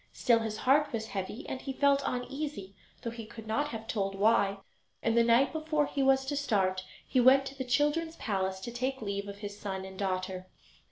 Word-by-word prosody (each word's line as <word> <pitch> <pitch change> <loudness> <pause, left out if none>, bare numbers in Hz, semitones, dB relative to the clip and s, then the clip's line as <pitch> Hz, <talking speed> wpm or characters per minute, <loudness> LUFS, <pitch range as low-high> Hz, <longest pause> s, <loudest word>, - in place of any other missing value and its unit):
Still 235 -2 +3
his 220 -1 -3
heart 285 +6 +3
was 220 -1 -3
heavy, 195 +4 -5
and 260 - -4
he 270 - -4
felt 280 +1 +3
uneasy, 250 -6 -4 0.3
though 230 - -3
he 230 0 -7
could 220 0 -10
not 255 +7 0
have 225 -5 -7
told 195 -4 -1
why; 200 -1 +3 0.5
and 230 - +2
the 235 - +6
night 235 +6 +4
before 310 -1 +1
he 280 - -2
was 270 0 +4
to 290 +2 -2
start 195 -9 +1 0.2
he 255 - +2
went 265 +2 +6
to 270 - -7
the 265 - -3
children's 295 +6 +1
palace 190 -3 -2
to 235 - -5
take 255 +1 -2
leave 200 0 -3
of 200 0 -7
his 205 0 -7
son 190 -2 -4
and 190 0 -10
daughter. 185 -1 -2
230 Hz, 210 wpm, -30 LUFS, 200-270 Hz, 0.5 s, the